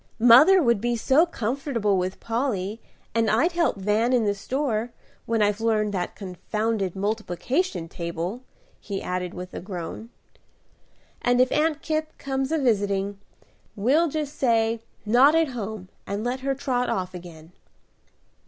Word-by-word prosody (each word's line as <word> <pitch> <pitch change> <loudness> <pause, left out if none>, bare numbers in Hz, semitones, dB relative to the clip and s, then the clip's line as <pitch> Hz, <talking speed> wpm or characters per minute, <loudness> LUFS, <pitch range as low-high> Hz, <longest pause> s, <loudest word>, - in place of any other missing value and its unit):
"Mother 265 +11 +7
would 235 -5 +2
be 240 +1 0
so 275 +8 +3
comfortable 235 - -1
with 185 0 -2
Polly, 225 -3 -2 0.3
and 230 -1 +2
I'd 285 +12 +3
help 340 -2 +1
Van 210 +5 +1
in 240 -3 +3
the 205 - +2
store, 240 +1 -2 0.4
when 225 -2 +2
I've 205 +1 +1
learned 215 -2 +1
that 180 -2 -3
confounded 200 +1 -3
multiplication 210 - -1
table," 170 +6 -4 0.4
he 200 -2 -5
added 180 -1 -4
with 180 0 -8
a - - -5
groan; 185 +4 -7 1.1
"and 245 0 +2
if 255 0 +4
Aunt 310 0 +1
Kipp 310 0 -2
comes 270 0 -2
a 320 - +2
visiting, 200 -6 0 0.6
we'll 275 +11 +3
just 300 -1 -3
say 230 -2 +2 0.2
'Not 255 +8 +5
at 325 -2 +3
home,' 220 -5 -6 0.2
and 200 +2 -3
let 245 +2 -2
her 270 +1 -1
trot 250 -2 -1
off 185 -1 -2
again." 170 -2 -11
225 Hz, 145 wpm, -25 LUFS, 195-265 Hz, 1.1 s, Mother